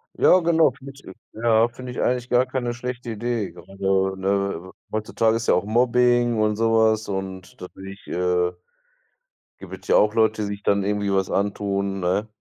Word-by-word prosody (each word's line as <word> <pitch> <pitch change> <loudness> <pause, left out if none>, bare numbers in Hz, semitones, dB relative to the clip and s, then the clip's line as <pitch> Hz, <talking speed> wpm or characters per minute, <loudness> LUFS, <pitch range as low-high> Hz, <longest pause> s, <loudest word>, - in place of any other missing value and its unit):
Ja 185 - +5
genau, 165 -4 +3
finde 135 +2 -12
ich 140 - -17
äh, 95 - -10 0.3
ja, 115 0 +4
finde 125 +1 -9
ich - - -4
eigentlich 125 0 -1
gar 125 +1 +3
keine 125 -2 -2
schlechte 120 0 -6
Idee. 115 -3 -3
Grade, 95 +2 -1
ne, 100 -2 -2 0.2
heutzutage 110 +1 0
ist 115 - -5
ja - - +5
auch 90 - +1
Mobbing 120 0 +2
und 105 -1 +1
so 115 +1 +1
was 110 -1 +2
und 95 -2 -6
natürlich, 95 +2 -10
äh 90 0 0 1.1
gibt 95 -1 -10
es - - -17
ja - - +3
auch 105 +1 +4
Leute, 110 -1 +2
die - - -2
sich 100 0 -6
dann 100 -1 +2
irgendwie 100 0 -1
was 95 -1 0
antun, 100 -1 -1
ne? 95 +4 0
105 Hz, 185 wpm, -23 LUFS, 95-120 Hz, 1.1 s, Ja